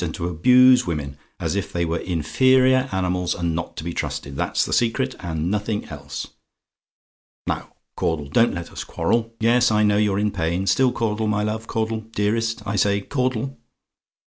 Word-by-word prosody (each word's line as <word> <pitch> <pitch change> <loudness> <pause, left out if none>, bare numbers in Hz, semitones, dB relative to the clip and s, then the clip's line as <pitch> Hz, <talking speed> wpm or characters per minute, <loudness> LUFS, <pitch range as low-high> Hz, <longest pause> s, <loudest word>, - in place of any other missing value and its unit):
And 80 -2 -3
to 85 - -3
abuse 125 +9 +5
women, 75 -5 -3 0.2
as - - -2
if - - -2
they 85 -1 -1
were 85 +1 -1
inferior 130 - +3
animals, 90 -1 -1
and 85 -1 -1
not 85 +1 -5
to - - -5
be 85 0 -4
trusted. 70 -3 -4
That's - - 0
the - - -3
secret; 130 +3 +1
and 80 0 -3
nothing 105 0 -2
else. - - -6 1.2
"Now, - - -4 0.2
Caudle, 75 -4 -1
don't 115 +10 +3
let 85 0 -6
us - - -6
quarrel. 115 0 -1
Yes, 120 +2 +4
I 105 -1 +3
know 105 -1 +3
you're 105 -2 +2
in 105 0 +1
pain. 90 0 -1
Still, 130 +5 +3
Caudle, 110 -2 -1
my 105 0 0
love; 110 +1 -3
Caudle! 110 0 -2
Dearest, 115 +2 0
I 100 +1 -2
say! 100 +1 +2
Caudle!" 130 +2 -2
105 Hz, 175 wpm, -22 LUFS, 85-115 Hz, 1.2 s, abuse